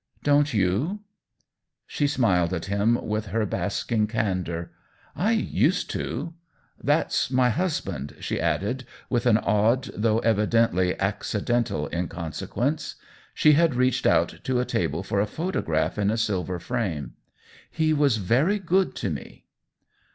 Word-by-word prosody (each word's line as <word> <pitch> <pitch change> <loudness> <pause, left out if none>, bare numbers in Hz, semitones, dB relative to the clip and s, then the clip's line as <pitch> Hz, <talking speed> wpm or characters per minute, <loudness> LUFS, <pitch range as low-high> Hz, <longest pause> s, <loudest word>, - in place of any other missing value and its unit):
" - - -34
Dont 145 0 +3
you 110 - 0 0.4
?" - - -60
She 145 - 0
smiled 95 - +2
at 85 - -4
him 100 +4 +2
with 105 0 -2
her 110 +3 0
basking 105 +2 -1
can 105 -4 0
dor. 85 -1 -5 0.2
" - - -32
I 205 +7 +1
used 220 - +1
to. 170 - -4 0.5
That's 145 -3 +1
my 125 -1 +3
husband," 150 - -2
she - - -3
added, 125 +6 -1 0.3
with 120 -1 +1
an 110 -3 +5
odd, 110 +5 +1
though 110 +1 +2
evidently 105 -4 +2
ac 100 +1 -1
cidental 110 -8 -1
inconsequence. 85 -1 -3 0.4
She 150 - +5
had 160 -2 +3
reached 125 0 +2
out - - +2
to 130 -1 0
a 125 - 0
table - - -1
for 100 - -1
a 105 - +1
photograph 105 - -1
in 100 -1 +2
a 110 - 0
silver 95 -5 -1
frame. 85 - -3 0.3
" - - -23
He 155 -1 +1
was 145 -6 +3
very 130 - +2
good 190 0 +1
to - - -2
me." - - -8
115 Hz, 150 wpm, -25 LUFS, 100-140 Hz, 0.5 s, an